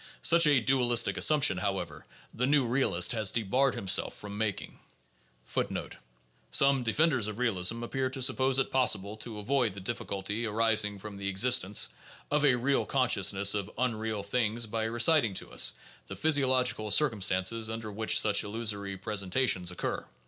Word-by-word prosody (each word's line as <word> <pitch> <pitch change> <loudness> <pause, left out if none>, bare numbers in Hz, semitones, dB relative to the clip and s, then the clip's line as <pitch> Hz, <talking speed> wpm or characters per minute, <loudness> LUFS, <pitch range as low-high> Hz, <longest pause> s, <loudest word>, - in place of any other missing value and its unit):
Such 170 -1 +5
a 145 -3 +4
dualistie 120 -1 +1
assumption, 145 -11 +3
however, 95 -6 -5 0.3
the 125 +3 -1
new 140 -2 +2
realist 115 -8 +1
has 110 -5 +2
debarred 125 +5 0
himself 95 +1 0
from 100 -1 -9
making. 105 -2 -4 0.7
4 - - -2 0.5
* - - -36
Some 135 -1 +3
defenders 125 0 0
of 110 -1 -6
realism 115 -1 -1
appear 130 +2 -3
to 130 0 -6
suppose 130 0 +2
it 135 - 0
possible 105 -6 +1
to 110 0 -8
avoid 115 -1 -1
the - - -8
diffi 105 +6 -5
culty 105 +4 -4
arising 110 -2 0
from 100 0 -10
the 100 0 -5
existence 100 0 +2 0.4
of 150 0 +1
a 135 -4 +4
real 135 +3 0
consciousness 100 -6 +2
of 100 -1 -4
unreal 110 -4 -3
things 115 +2 -2
by 110 +1 -3
reciting 120 0 +2
to - - -3
us - - +2 0.3
the - - -8
physiological 130 -7 +1
circumstances 105 -3 +1
under 110 -1 -6
which 110 +2 +1
such 105 -2 +2
illusory 105 -2 -4
presen 100 -1 -4
tations 95 -7 +1
occur. 90 - -4
110 Hz, 160 wpm, -29 LUFS, 100-130 Hz, 0.7 s, Such